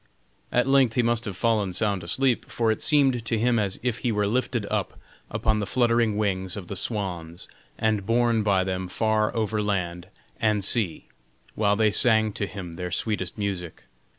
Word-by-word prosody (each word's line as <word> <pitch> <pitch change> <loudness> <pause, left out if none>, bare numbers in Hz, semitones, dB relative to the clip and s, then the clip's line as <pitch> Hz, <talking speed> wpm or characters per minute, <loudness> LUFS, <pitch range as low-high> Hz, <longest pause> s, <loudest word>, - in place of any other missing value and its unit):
At 125 - +2
length 135 -4 +3
he 125 - +3
must 115 -1 +1
have 95 -3 -5
fallen 105 -5 +1
sound 100 -2 0
asleep, 130 +7 +1
for 115 -2 +1
it 110 - -3
seemed 135 -5 +3
to 115 0 -1
him 120 +1 +2
as 100 -3 -2
if 120 -3 -1
he 120 - -1
were 105 -1 0
lifted 120 0 -1
up - - -3 0.3
upon 110 -1 0
the 100 - -3
fluttering 115 -2 +2
wings 95 -2 -1
of 100 - -6
the 100 - -4
swans 90 -5 -3 0.3
and 110 -2 0
borne 115 +1 +2
by 100 -3 +2
them 95 0 -3
far 110 +3 +1
over 110 -1 0
land 90 -4 -2 0.3
and 105 -3 +1
sea, 100 -4 +1 0.5
while 105 -1 +2
they 110 0 +3
sang 110 -1 +4
to 100 - -3
him 95 -5 -8
their 90 +1 -5
sweetest 100 +1 -2
music. 95 -5 -4
105 Hz, 180 wpm, -25 LUFS, 95-115 Hz, 0.5 s, sang